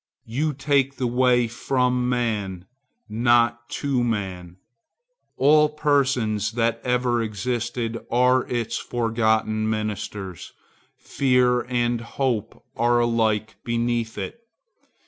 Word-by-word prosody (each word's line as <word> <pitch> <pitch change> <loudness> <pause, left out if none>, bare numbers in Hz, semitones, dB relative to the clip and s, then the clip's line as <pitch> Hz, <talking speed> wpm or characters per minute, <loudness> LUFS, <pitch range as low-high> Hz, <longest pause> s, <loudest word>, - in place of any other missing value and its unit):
You 145 +7 -1
take 140 -1 +1
the 130 - -2
way 125 0 +3
from 125 +1 0
man, 105 -7 -2 0.4
not 120 +1 +2
to 135 -4 +1
man. 95 -6 -3 0.8
All 150 +2 +5
persons 130 -8 +1
that 115 0 0
ever 125 -1 +1
existed 115 +1 -3
are 125 +1 +3
its 120 -2 -2
forgotten 110 -2 0
ministers. 105 -4 -4 0.4
Fear 125 -2 +1
and 120 -1 0
hope 120 -2 -3
are 120 +1 +2
alike 110 -2 0
beneath 115 -1 -1
it. 235 - -6
120 Hz, 100 wpm, -23 LUFS, 110-125 Hz, 0.8 s, All